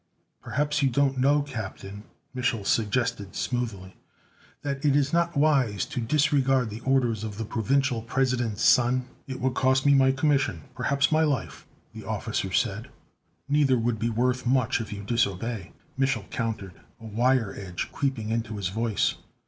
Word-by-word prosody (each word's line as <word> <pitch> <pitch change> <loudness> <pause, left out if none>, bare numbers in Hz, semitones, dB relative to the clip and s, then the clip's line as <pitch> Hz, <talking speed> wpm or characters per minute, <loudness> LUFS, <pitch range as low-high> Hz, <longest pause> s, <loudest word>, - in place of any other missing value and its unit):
"Perhaps 150 +2 -1
you 135 - +3
don't 135 +1 +1
know, 145 +2 +3
Captain," 105 -5 -7 0.3
Mich'l 125 -5 -1
suggested 110 -2 0
smoothly, 110 -7 -3 0.7
"that 140 -1 -3
it 145 -2 +3
is 145 0 +1
not 170 -2 +1
wise 135 - +2
to 140 -5 -4
disregard 135 -2 +2
the 110 - -6
orders 120 -4 +1
of 105 -2 -5
the 115 - -3
Provisional 120 +2 0
President's 120 -3 -1
son?" 125 0 +4 0.2
"It 130 -1 -5
would 130 0 0
cost 130 +1 +2
me 140 - +6
my 135 -1 +5
commission, 135 - +1
perhaps 140 +1 +1
my 155 0 +4
life!" 140 -7 -2 0.3
the - - -9
officer - - -3
said. - - -1 0.6
"Neither 140 -3 +3
would 115 -1 -1
be 115 +1 0
worth 125 +3 0
much 125 -1 +2
if 110 - -7
you 100 -1 -6
disobey!" 110 -2 -1 0.3
Mich'l 135 0 0
countered, 110 -5 -3 0.3
a 115 - -12
wire 115 0 +1
edge 90 -3 -5
creeping 130 -6 -2
into 115 -2 -2
his 95 -3 -2
voice. 110 +1 0
125 Hz, 155 wpm, -26 LUFS, 110-135 Hz, 0.7 s, me